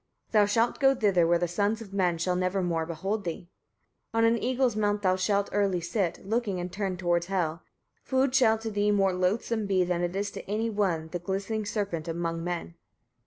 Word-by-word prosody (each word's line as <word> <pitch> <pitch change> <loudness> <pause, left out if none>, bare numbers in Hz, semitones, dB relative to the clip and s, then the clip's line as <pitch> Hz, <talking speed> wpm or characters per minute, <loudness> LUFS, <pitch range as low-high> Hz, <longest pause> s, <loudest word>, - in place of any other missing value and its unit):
Thou 210 -2 +5
shalt 230 +3 +1
go 270 -1 +5
thither, 195 -8 +3
where 170 +1 +4
the 175 +1 0
sons 205 +5 0
of 205 -4 -10
men 180 -4 +1
shall 180 +2 0
never 185 +1 0
more 165 -2 -1
behold 195 +6 -3
thee. 175 0 -6 0.6
27. - - -12
On 225 - +3
an 230 0 +2
eagle's 255 -2 +1
mount 205 -1 0
thou 185 -1 +3
shalt 200 +2 +1
early 200 -3 +1
sit, 175 +1 -2
looking 215 -4 -1
and 175 0 -5
turned 195 -2 -2
towards 175 -1 0
Hel. 170 -4 -1 0.4
Food 265 0 +1
shall 230 -4 +4
to 225 0 -5
thee 205 0 +1
more 195 -2 +3
loathsome 205 +4 0
be 190 -2 +3
than 175 -1 -1
is 195 +3 -2
to - - -9
any 225 +2 -1
one 180 -6 0
the 175 - -4
glistening 200 +4 -3
serpent 195 -7 -2
among 165 0 -2
men. 175 -1 -4
195 Hz, 205 wpm, -28 LUFS, 175-215 Hz, 0.6 s, Thou